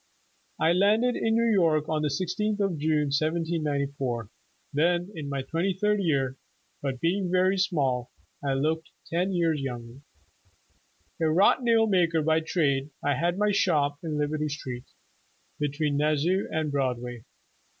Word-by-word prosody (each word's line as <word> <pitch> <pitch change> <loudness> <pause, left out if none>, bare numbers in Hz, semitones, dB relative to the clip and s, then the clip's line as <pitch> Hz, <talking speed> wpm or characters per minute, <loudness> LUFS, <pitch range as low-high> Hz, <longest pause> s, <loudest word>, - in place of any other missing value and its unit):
"I 165 - +3
landed 215 +7 +3
in 225 0 +1
New 230 0 +3
York 160 -6 +2
on 155 -1 0
the 155 - +1
16th 185 +8 -1
of 195 -6 0
June, 150 -1 +1
1794, 140 -7 -1 0.4
then 175 +5 +1
in 150 -4 -6
my 140 -1 -2
twenty 170 +7 -1
third 210 0 +2
year, 135 -6 0 0.4
but 135 -3 -3
being 180 +4 0
very 185 +2 +2
small, 135 -10 0 0.3
I 135 -1 0
looked 160 +4 -1 0.2
ten 180 +3 +1
years 165 -5 +1
younger. 120 -1 -6 1.2
A 160 - +3
wrought 185 +10 +4
nail 230 -2 +4
maker 170 -6 +2
by 160 +1 +3
trade, 145 -4 0
I 145 - +2
had 175 +6 0
my 210 0 +2
shop 145 -7 +1
in 155 -2 -3
Liberty 150 +1 -1
Street, 130 -4 -6 0.7
between 145 0 -1
Nas 150 0 +2
sau 185 +4 +1
and 155 -2 -1
Broadway. 125 -4 -2
155 Hz, 150 wpm, -27 LUFS, 140-180 Hz, 1.2 s, wrought